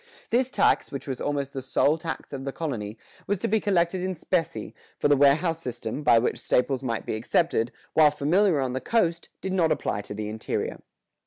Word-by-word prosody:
[118:2] 480 - -29 0.2
This 245 +2 +2
tax, - - +2
which 140 - -5
was 130 -3 -4
almost 140 -1 -2
the 135 - -4
sole 140 +3 +2
tax 165 -2 -6
of 135 -1 -5
the 135 - -3
colony, 120 -10 -4 0.3
was 205 - +1
to - - -2
be 220 +2 +2
collected 185 -3 +1
in 185 0 -2
specie, 165 0 -2 0.2
for - - +2
the 145 - +5
warehouse 155 +4 +3
system, 120 0 -5
by 145 -6 +5
which 115 - +1
staples 130 +1 +1
might 115 -4 -3
be - - -2
accepted, 115 +2 +1 0.2
while 155 -1 +6
familiar 160 +4 +2
on 130 -2 -1
the 130 - -2
coast, 170 -7 0
did 190 - -3
not 170 -4 +2
apply 100 - -1
to 105 0 -8
the 105 0 -4
interior. 110 +1 -3
145 Hz, 210 wpm, -26 LUFS, 130-175 Hz, 0.3 s, while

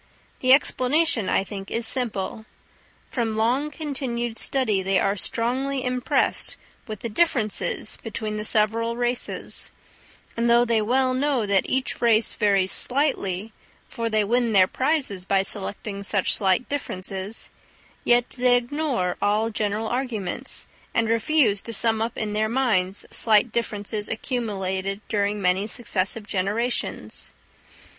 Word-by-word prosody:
The 255 - +3
explanation, 270 - +3
I - - +2
think, 195 -1 -8
is 230 0 0
simple: 220 -3 +1 0.7
from 230 -3 -1
long 245 +7 +1
continued 260 -6 -4
study 225 -8 0
they 190 0 +1
are 195 +1 +1
strongly 255 +6 -1
impressed 250 0 +1 0.3
with 215 -3 -7
the - - -3
differences 225 -5 0
between 215 -1 -4
the 210 - -3
several 230 +2 +1
races; 245 0 -2 0.7
and 235 +1 +1
though 240 +1 +5
they 230 -2 +2
well 255 +4 +1
know 260 -3 +1
that 200 -2 +2
each 265 0 -1
race 225 -2 +3
varies 195 -2 +2
slightly, 225 -7 -1 0.3
for 230 0 -3
they 215 -1 +2
win 235 +2 +1
their 190 -2 +7
prizes 260 - 0
by 195 0 +2
selecting 200 +1 -3
such 200 -1 +1
slight 195 +3 +1
differences, 195 -6 -4 0.5
yet 240 0 +4
they 250 -1 +3
ignore 245 - -1
all 210 +2 +1
general 210 +1 -2
arguments, 235 -7 0 0.3
and 225 -1 +2
refuse 230 -3 +2
to 230 - -6
sum 225 0 +3
up 230 +1 -2
in 210 -1 -2
their 215 +1 +1
minds 210 -7 0
slight 220 +1 +4
differences 210 -2 -3
accumulated 195 -5 -2
during 205 -1 0
many 190 +2 +1
successive 215 -2 -1
generations. 210 +5 -1
225 Hz, 135 wpm, -24 LUFS, 205-245 Hz, 0.7 s, their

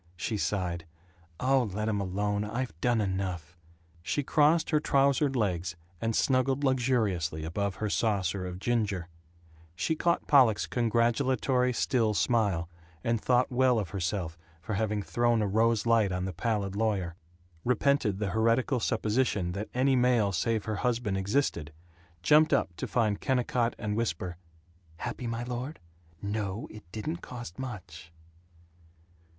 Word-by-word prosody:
She 90 +5 -2
sighed, 90 -5 -2 0.5
"Oh, 130 -3 +2
let 105 +1 -1
'em 105 -2 0
alone. 100 +2 -1
I've 120 +1 -3
done 120 -2 +2
enough." 95 -4 -3 0.5
She 145 - -1
crossed 155 +4 +3
her 155 - +4
trousered 140 -1 +2
legs, 90 -7 -1 0.3
and 115 -1 0
snuggled 135 +1 +2
luxuriously 110 - +1
above 100 +4 -2
her 110 - -2
saucer 100 -4 0
of 90 0 -6
ginger; 100 -5 -1 0.7
she 160 - 0
caught 170 +2 +1
Pollock's 125 -7 +5
congratulatory 125 +2 +1
still 115 -3 +1
smile, 100 -8 +1 0.4
and 115 -2 0
thought 125 0 +2
well 125 -1 +3
of 100 -5 -2
herself 85 -3 -3 0.2
for 95 +6 -5
having 105 0 -1
thrown 120 +6 +1
a - - 0
rose 110 +2 +2
light 115 -4 +3
on 90 0 -2
the 95 - -4
pallid 100 0 -1
lawyer; 100 -5 0 0.5
repented 125 -4 +2
the 100 -2 -2
heretical 115 +4 +2
supposition 110 -5 0
that 100 +4 -5
any 130 +2 +2
male 120 -5 +3
save 110 +4 0
her 110 -2 -2
husband 115 -4 0
existed; 95 - 0 0.5
jumped 155 - +5
up 85 - +1
to - - -3
find 110 -4 0
Kennicott 125 -2 +1
and 105 -2 -2
whisper, 90 -6 -2 0.6
"Happy, 120 - -4
my 115 +1 -3
lord?... 125 +5 -5 0.4
No, 100 0 -3
it 105 -5 -13
didn't 150 - -3
cost 120 - -9
much!" 90 -10 -7
110 Hz, 140 wpm, -29 LUFS, 95-125 Hz, 0.7 s, Pollock's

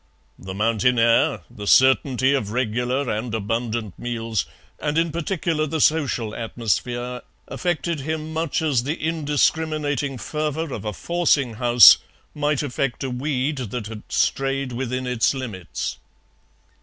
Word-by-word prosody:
The 95 0 -7
mountain 115 +3 +2
air, 115 -3 +3
the 105 -1 -9
certainty 130 +1 +4
of 130 -8 -1
regular 125 +3 -1
and 115 +1 -2
abundant 110 -1 -3
meals, 115 -3 -2 0.3
and 150 +1 -1
in 165 0 +2
particular 165 -1 -1
the 160 +2 -2
social 135 -8 +1
atmosphere, 120 +2 -2 0.3
affected 170 -2 -2
him 155 +2 -4
much 160 0 -1
as 140 -6 +2
the 145 +6 -2
indiscriminating 150 -3 0
fervour 155 +2 -3
of 105 - -6
a 105 - -2
forcing 150 - +1
house 120 0 +8 0.3
might 150 -1 0
affect 135 -1 -2
a 130 - -3
weed 135 +2 -1
that 120 -2 -4
had 110 0 -7
strayed 135 -1 0
within 130 +1 -3
its 125 +1 +1
limits. 105 -11 -5
130 Hz, 130 wpm, -23 LUFS, 115-150 Hz, 0.3 s, house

